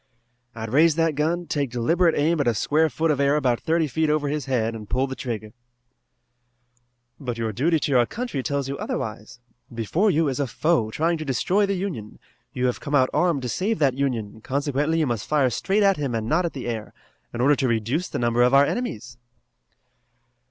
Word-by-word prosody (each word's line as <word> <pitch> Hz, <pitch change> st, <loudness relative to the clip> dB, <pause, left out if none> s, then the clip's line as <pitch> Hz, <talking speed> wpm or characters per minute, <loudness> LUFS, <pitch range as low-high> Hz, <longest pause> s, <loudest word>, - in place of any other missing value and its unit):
"I'd 110 Hz, 0 st, -6 dB
raise 155 Hz, +2 st, +5 dB
that 165 Hz, -1 st, +2 dB
gun, 165 Hz, +4 st, -1 dB
take 145 Hz, -4 st, -1 dB
deliberate 165 Hz, +9 st, +2 dB
aim 155 Hz, +1 st, +2 dB
at 140 Hz, -, -1 dB
a 120 Hz, -, +2 dB
square 155 Hz, +8 st, +2 dB
foot 160 Hz, +1 st, 0 dB
of 145 Hz, -, -1 dB
air 140 Hz, +1 st, +3 dB
about 125 Hz, -5 st, +1 dB
thirty 165 Hz, 0 st, +1 dB
feet 155 Hz, +2 st, 0 dB
over 150 Hz, -1 st, +1 dB
his 150 Hz, 0 st, -2 dB
head 115 Hz, -4 st, 0 dB
and 110 Hz, -2 st, -9 dB
pull 130 Hz, +1 st, +1 dB
the 130 Hz, -1 st, -6 dB
trigger." 110 Hz, -5 st, -5 dB, 1.7 s
"But 125 Hz, -5 st, -4 dB
your 115 Hz, -1 st, -2 dB
duty 155 Hz, -, +1 dB
to -, -, -1 dB
your 125 Hz, -3 st, +4 dB
country 240 Hz, -, -4 dB
tells 140 Hz, -1 st, -2 dB
you 135 Hz, -, -3 dB
to -, -, -7 dB
do -, -, -4 dB
otherwise. 110 Hz, +3 st, -5 dB, 0.3 s
Before 120 Hz, -, 0 dB
you 160 Hz, -3 st, +2 dB
is 135 Hz, 0 st, -2 dB
a 140 Hz, -, 0 dB
foe 155 Hz, -4 st, +1 dB
trying 165 Hz, +7 st, 0 dB
to -, -, -3 dB
destroy 180 Hz, -, +1 dB
the 200 Hz, -, 0 dB
Union. 170 Hz, -, -5 dB, 0.3 s
You 125 Hz, -, -2 dB
have 125 Hz, -, 0 dB
come 145 Hz, -, -2 dB
out 130 Hz, -2 st, +3 dB
armed 170 Hz, -7 st, +1 dB
to 125 Hz, -, -3 dB
save 205 Hz, -, -1 dB
that 140 Hz, -4 st, +2 dB
Union, 120 Hz, -6 st, -3 dB
consequently 145 Hz, +5 st, -1 dB
you 160 Hz, -, +2 dB
must 120 Hz, -5 st, -3 dB
fire 140 Hz, -4 st, +2 dB
straight 200 Hz, -, +1 dB
at 195 Hz, -1 st, +4 dB
him 140 Hz, -5 st, -2 dB
and 110 Hz, -1 st, -2 dB
not 170 Hz, +7 st, +2 dB
at 170 Hz, -, -3 dB
the 130 Hz, -, -6 dB
air, 110 Hz, -3 st, -5 dB, 0.4 s
in 120 Hz, -, -6 dB
order 140 Hz, +4 st, +4 dB
to 130 Hz, -, +1 dB
reduce 120 Hz, -, -1 dB
the -, -, -4 dB
number 120 Hz, 0 st, +1 dB
of 125 Hz, +2 st, +4 dB
our 140 Hz, +1 st, +7 dB
enemies." 120 Hz, -, -4 dB
140 Hz, 215 wpm, -24 LUFS, 120-160 Hz, 1.7 s, our